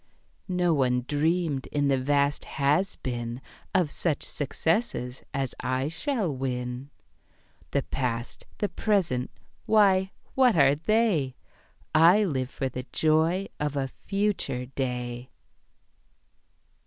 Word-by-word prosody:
"No 180 Hz, -2 st, +2 dB
one 125 Hz, -4 st, +1 dB
dreamed, 155 Hz, -1 st, 0 dB
in 145 Hz, -1 st, 0 dB
the 135 Hz, -1 st, +2 dB
vast 140 Hz, +1 st, +1 dB
Has 150 Hz, +7 st, +2 dB
Been, 120 Hz, -1 st, -4 dB, 0.4 s
Of 170 Hz, -6 st, +3 dB
such 155 Hz, -1 st, -1 dB
successes 145 Hz, -, -1 dB
as 135 Hz, -3 st, -2 dB
I 130 Hz, +2 st, -1 dB
shall 200 Hz, -, -1 dB
win. 125 Hz, 0 st, -3 dB, 0.8 s
"The 140 Hz, -, 0 dB
past, 120 Hz, -3 st, -3 dB
the 205 Hz, -, 0 dB
present 185 Hz, -, 0 dB, 0.4 s
why, 195 Hz, -3 st, +4 dB, 0.2 s
what 255 Hz, -4 st, +4 dB
are 140 Hz, -3 st, +6 dB
they? 165 Hz, -, +1 dB, 0.6 s
I 170 Hz, +7 st, +6 dB
live 130 Hz, -9 st, -1 dB
for 135 Hz, -1 st, -3 dB
the 130 Hz, 0 st, -6 dB
joy 160 Hz, +5 st, +2 dB
of 150 Hz, -1 st, -1 dB
a 135 Hz, -1 st, -1 dB, 0.2 s
future 195 Hz, -11 st, 0 dB
day." 125 Hz, -1 st, -4 dB
145 Hz, 115 wpm, -27 LUFS, 130-180 Hz, 0.8 s, are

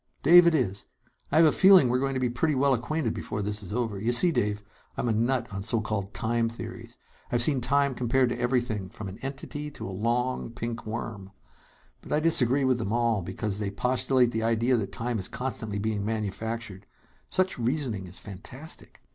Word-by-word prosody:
"Dave 170 Hz, +3 st, +8 dB
it 170 Hz, -, +4 dB
is. 105 Hz, -8 st, -1 dB, 0.4 s
I -, -, +2 dB
have 165 Hz, -, +7 dB
a 155 Hz, -, +5 dB
feeling 190 Hz, -6 st, +7 dB
we're 125 Hz, +1 st, +1 dB
going 135 Hz, 0 st, -1 dB
to -, -, 0 dB
be 125 Hz, -, +1 dB
pretty 140 Hz, +6 st, 0 dB
well 135 Hz, +1 st, +3 dB
acquainted 125 Hz, 0 st, -1 dB
before 105 Hz, 0 st, -4 dB
this 105 Hz, +1 st, -3 dB
is 95 Hz, -, -9 dB
over. 110 Hz, -3 st, -2 dB
You 115 Hz, +4 st, 0 dB
see, 170 Hz, +9 st, +5 dB
Dave, 105 Hz, -7 st, -1 dB, 0.3 s
I'm -, -, -1 dB
a -, -, +2 dB
nut 120 Hz, +3 st, +1 dB
on 95 Hz, -, -4 dB
so 115 Hz, +3 st, +3 dB
called 105 Hz, -2 st, -3 dB
'time 115 Hz, +3 st, 0 dB
theories.' 115 Hz, +1 st, -9 dB, 0.3 s
I've 120 Hz, 0 st, +5 dB
seen 135 Hz, -1 st, +2 dB
time 140 Hz, +2 st, +2 dB
compared 125 Hz, +1 st, +1 dB
to 120 Hz, 0 st, -4 dB
everything 120 Hz, -6 st, -1 dB
from 100 Hz, +2 st, -8 dB
an 95 Hz, +4 st, -10 dB
entity 145 Hz, +2 st, -5 dB
to 145 Hz, -, -8 dB
a -, -, -6 dB
long, 120 Hz, +5 st, -1 dB
pink 115 Hz, -1 st, -6 dB
worm. 110 Hz, -3 st, -6 dB, 0.7 s
But -, -, -12 dB
I 150 Hz, -, +3 dB
disagree 140 Hz, -4 st, +3 dB
with 130 Hz, -2 st, +2 dB
them 105 Hz, -3 st, -3 dB
all, 115 Hz, -3 st, +1 dB
because 100 Hz, +3 st, -4 dB
they 105 Hz, -2 st, -2 dB
postulate 125 Hz, +3 st, +1 dB
the 110 Hz, -, -2 dB
idea 115 Hz, +3 st, +2 dB
that 105 Hz, -5 st, -2 dB
time 115 Hz, -1 st, -2 dB
is 95 Hz, -, -1 dB
constantly 115 Hz, -5 st, -3 dB
being 105 Hz, 0 st, -2 dB
manufactured. 110 Hz, -1 st, -4 dB, 0.4 s
Such 185 Hz, -6 st, 0 dB
reasoning 120 Hz, -6 st, -1 dB
is 90 Hz, -, -3 dB
fantastic! 125 Hz, -, -9 dB
120 Hz, 200 wpm, -27 LUFS, 105-130 Hz, 0.7 s, Dave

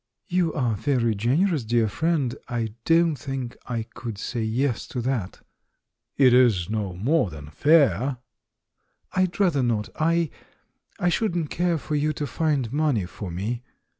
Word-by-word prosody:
"You 175 Hz, -2 st, +2 dB
are 125 Hz, -5 st, +1 dB
very 120 Hz, -1 st, +1 dB
generous, 140 Hz, -, +1 dB
dear 115 Hz, 0 st, +2 dB
friend; 140 Hz, +1 st, 0 dB
I 115 Hz, -3 st, -2 dB
don't 165 Hz, -1 st, +4 dB
think 135 Hz, -3 st, -5 dB
I 115 Hz, -2 st, -2 dB
could 115 Hz, -1 st, -7 dB
say 115 Hz, +3 st, -3 dB
'yes' 115 Hz, +3 st, -1 dB
to 125 Hz, -, -4 dB
that." 120 Hz, -7 st, -3 dB, 0.7 s
"It 130 Hz, -3 st, +6 dB
is 110 Hz, -7 st, +4 dB
no 105 Hz, -4 st, -2 dB
more 125 Hz, -, +1 dB
than 75 Hz, -2 st, -10 dB
fair." 135 Hz, -, +3 dB, 0.9 s
"I'd 185 Hz, 0 st, 0 dB
rather 175 Hz, -9 st, +3 dB
not. 115 Hz, -4 st, 0 dB
I 165 Hz, 0 st, +1 dB, 0.3 s
— -, -, -37 dB
I 175 Hz, -, +2 dB
shouldn't 175 Hz, -4 st, 0 dB
care 175 Hz, -1 st, +1 dB
for 155 Hz, +1 st, -6 dB
you 150 Hz, +1 st, +1 dB
to 150 Hz, -, -3 dB
find 140 Hz, -4 st, -1 dB
money 145 Hz, -, +1 dB
for 95 Hz, +2 st, -7 dB
me!" 105 Hz, +8 st, -3 dB
130 Hz, 155 wpm, -25 LUFS, 110-155 Hz, 0.9 s, It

